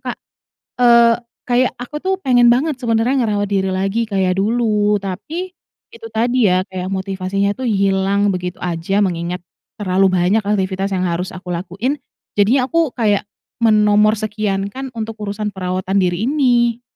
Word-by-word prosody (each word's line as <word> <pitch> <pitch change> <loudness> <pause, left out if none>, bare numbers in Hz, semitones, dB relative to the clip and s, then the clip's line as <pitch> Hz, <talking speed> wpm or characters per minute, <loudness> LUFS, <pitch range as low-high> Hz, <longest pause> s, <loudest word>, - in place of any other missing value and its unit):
Kak, - - -11 0.7
eee, 235 -1 +6 0.3
kayak 250 +1 +2
aku 245 +5 -6
tuh 380 0 0
pengen 245 -2 +5
banget 265 +2 +1
sebenarnya 235 +3 +1
ngerawat 205 -1 0
diri 190 -1 0
lagi 195 +4 -1
kayak 190 -2 0
dulu. 210 -1 +1
Tapi 305 - -5 0.4
itu 460 0 -9
tadi 240 -2 +2
ya, 185 +1 +1
kayak 185 -1 -5
motivasinya 195 +1 -1
tuh 260 - -6
hilang 195 0 +1
begitu 180 -1 -4
aja, 175 +2 -2
mengingat 175 -2 -1 0.4
terlalu 190 -1 +2
banyak 185 +4 +2
aktivitas 195 -1 -1
yang 185 -1 0
harus 175 +2 -2
aku 180 -1 -6
lakuin. 195 +10 -2 0.4
Jadinya 235 +6 +3
aku 330 +1 +1
kayak 210 -4 +2 0.4
menomor 215 -1 +4
sekiankan 210 +3 -3
untuk 225 -2 -5
urusan 205 0 -3
perawatan 185 +1 -2
diri 180 +3 0
ini. 245 -4 +2
205 Hz, 145 wpm, -18 LUFS, 190-235 Hz, 0.7 s, eee